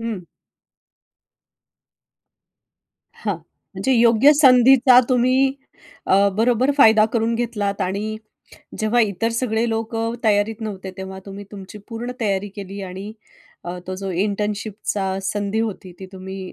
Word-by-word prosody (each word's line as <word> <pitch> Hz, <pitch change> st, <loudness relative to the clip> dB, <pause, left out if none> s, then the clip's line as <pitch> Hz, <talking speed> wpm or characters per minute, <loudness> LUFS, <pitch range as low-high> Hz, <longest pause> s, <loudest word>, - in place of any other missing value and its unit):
हं. 225 Hz, -6 st, -5 dB, 3.0 s
हां -, -, -1 dB, 0.4 s
म्हणजे 265 Hz, -, -1 dB
योग्य 235 Hz, +4 st, +5 dB
संधीचा 255 Hz, -1 st, +7 dB
तुम्ही 255 Hz, +2 st, +3 dB, 0.5 s
अ, 200 Hz, +1 st, +4 dB
बरोबर 245 Hz, +4 st, +2 dB
फायदा 220 Hz, -4 st, +6 dB
करून 230 Hz, 0 st, +1 dB
घेतलात 210 Hz, -4 st, -2 dB
आणि 205 Hz, +4 st, -3 dB, 0.6 s
जेव्हा 220 Hz, +3 st, +2 dB
इतर 215 Hz, 0 st, 0 dB
सगळे 230 Hz, -1 st, 0 dB
लोकं 225 Hz, +1 st, -2 dB
तयारीत 215 Hz, +1 st, +1 dB
नव्हते 195 Hz, -3 st, -6 dB
तेव्हा 190 Hz, 0 st, -7 dB
तुम्ही 200 Hz, +1 st, -8 dB
तुमची 200 Hz, +1 st, -10 dB
पूर्ण 240 Hz, +2 st, -5 dB
तयारी 200 Hz, -2 st, -1 dB
केली 200 Hz, 0 st, -7 dB
आणि 190 Hz, +3 st, -7 dB, 0.5 s
अ, 175 Hz, +1 st, -5 dB
तो 185 Hz, -, -4 dB
जो 195 Hz, 0 st, -5 dB
इंटर्नशिपचा 205 Hz, 0 st, -2 dB
संधी 205 Hz, +2 st, -2 dB
होती 200 Hz, -4 st, -4 dB
ती 190 Hz, -, -7 dB
तुम्ही 190 Hz, 0 st, -8 dB
215 Hz, 120 wpm, -21 LUFS, 195-230 Hz, 3.0 s, संधीचा